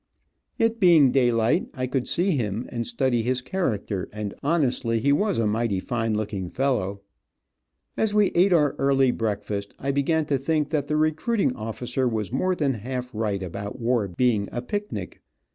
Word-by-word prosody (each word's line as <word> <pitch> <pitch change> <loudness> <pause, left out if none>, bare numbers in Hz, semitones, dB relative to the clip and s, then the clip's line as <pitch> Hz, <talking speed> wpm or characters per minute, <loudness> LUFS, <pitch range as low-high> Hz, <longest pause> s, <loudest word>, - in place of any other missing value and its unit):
It 225 0 +1
being 165 - +6
daylight, 120 -3 +2
I 130 - -1
could 130 0 -2
see 185 +3 +1
him, 115 - -1
and 115 -1 -3
study 120 0 +1
his 125 +2 -1
character, 110 - -2
and 105 -1 -5
honestly 130 -7 +1
he 140 +5 +3
was 200 +5 +1
a 115 - +1
mighty 105 -2 0
fine 115 +1 -1
looking 100 -4 -3
fellow. 100 -7 -1 0.9
As 220 - +1
we 210 -1 +3
eat 185 +3 +3
our 150 -5 +4
early 135 -2 +3
breakfast 105 -3 -3
I 140 - -2
began 150 +3 +1
to 140 -3 0
think 150 +1 0
that 145 -3 0
the 150 - 0
recruiting 155 - +1
officer 125 +4 -2
was 110 -3 -2
more 185 +7 +1
than 145 -5 +1
half 125 +2 -5
right 105 -3 -2
about 100 +6 -6
war 115 -3 +1
being 105 +2 +1
a 120 - -4
picnic. 205 +9 -5
125 Hz, 170 wpm, -25 LUFS, 110-150 Hz, 0.9 s, being